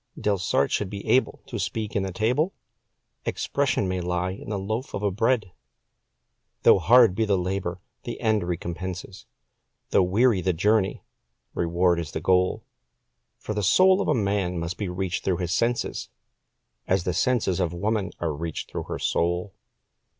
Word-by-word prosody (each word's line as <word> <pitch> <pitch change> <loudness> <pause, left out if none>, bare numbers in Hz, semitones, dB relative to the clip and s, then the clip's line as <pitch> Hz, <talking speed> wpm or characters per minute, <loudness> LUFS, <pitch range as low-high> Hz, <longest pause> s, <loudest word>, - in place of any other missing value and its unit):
Delsarte 100 -3 +1
should 105 - 0
be 100 0 -7
able 130 - +2
to 120 - -5
speak 105 +2 -3
in 100 - +2
the 95 0 -3
table 125 - 0 0.7
'Expression' 130 -8 0
may 90 0 -1
lie 90 +1 -1
in 100 +2 -8
a 105 - -1
light 95 - -5
loaf 110 +5 -3
of 100 -2 -1
bread. 115 -3 +1 1.1
Though - - +7
hard 115 +2 +6
be 110 - 0
the 100 -2 +2
labour, 90 -1 -3 0.2
the 120 - -6
end 110 -3 +2
recompenses 90 +2 -5 0.6
Though - - +5
weary 100 +3 +3
the 90 +1 +1
journey, 100 +3 +1 0.5
reward 85 +1 +2
is 80 -3 -5
the - - -2
goal. 90 0 +2 0.7
For 105 - -5
the 105 - -1
soul 185 - +5
of - - -2
a 150 - +3
man 100 -5 0
must 85 +1 -3
be 100 -4 -2
reached 90 0 -3
through 90 -2 +1
his 90 -1 -3
senses, 120 +5 -1 0.8
As 95 -1 +2
the 90 - -1
senses 105 -2 +1
of 90 -3 0
woman 100 +3 -1
are 80 -3 -1
reached 80 +1 -5
through - - -4
her - - -4
soul. 85 +3 -1
95 Hz, 165 wpm, -25 LUFS, 90-110 Hz, 1.1 s, Though